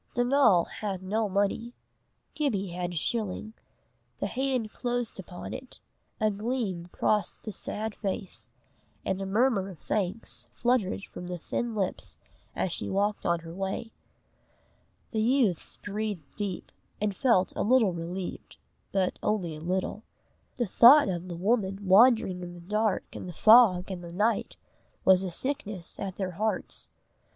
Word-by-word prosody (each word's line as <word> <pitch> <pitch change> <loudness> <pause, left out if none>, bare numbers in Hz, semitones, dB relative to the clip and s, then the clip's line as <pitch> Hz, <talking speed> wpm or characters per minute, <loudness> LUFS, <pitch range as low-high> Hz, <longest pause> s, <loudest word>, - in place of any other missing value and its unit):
Donal 245 -8 +4
had 195 -3 -5
no 210 +3 0
money. 205 +5 0 0.6
Gibbie 215 -11 -1
had 175 0 -3
a - - -7
shilling. 215 +4 -2 0.6
The - - -2
hand 255 -4 -1
closed 245 -3 -2
upon 180 -1 -7
it, 260 0 -9 0.4
a 215 -1 +2
gleam 205 -5 -2
crossed 210 -1 0
the 215 - -5
sad 215 +2 -4
face, 195 -2 -5 0.6
and 190 0 -1
a 195 - -3
murmur 205 -1 +2
of 185 - -10
thanks 190 +8 -3
fluttered 240 -6 +1
from 180 - -8
the 180 0 -4
thin 230 +7 -3
lips 195 -3 -3 0.4
as 185 - -1
she - - -3
walked 205 +1 0
on 170 -1 +1
her 165 0 -9
way. 195 +4 -3 1.2
The 220 - 0
youths 230 - +1
breathed 205 -7 -4
deep, 200 -3 -4 0.3
and 205 -1 -1
felt 230 -8 +3
a - - -1
little 225 -4 +4
relieved, 175 +2 -6 0.3
but 190 -2 0
only 185 -7 -1
a 155 - -9
little. 185 +5 -2 0.5
The 240 - 0
thought 240 +5 +8
of 175 -1 -3
the 170 - -5
woman 195 0 0
wandering 195 -2 +5
in 175 0 -7
the - - -10
dark 210 +3 0
and 185 - -7
the - - -7
fog 205 -3 +6
and 180 -2 -5
the 170 - -8
night, 210 +6 0 0.5
was 190 -1 +6
a 190 - -2
sickness 205 -4 -3
at 190 -2 -4
their 190 -2 -3
hearts. 215 +5 -3
200 Hz, 150 wpm, -28 LUFS, 185-225 Hz, 1.2 s, thought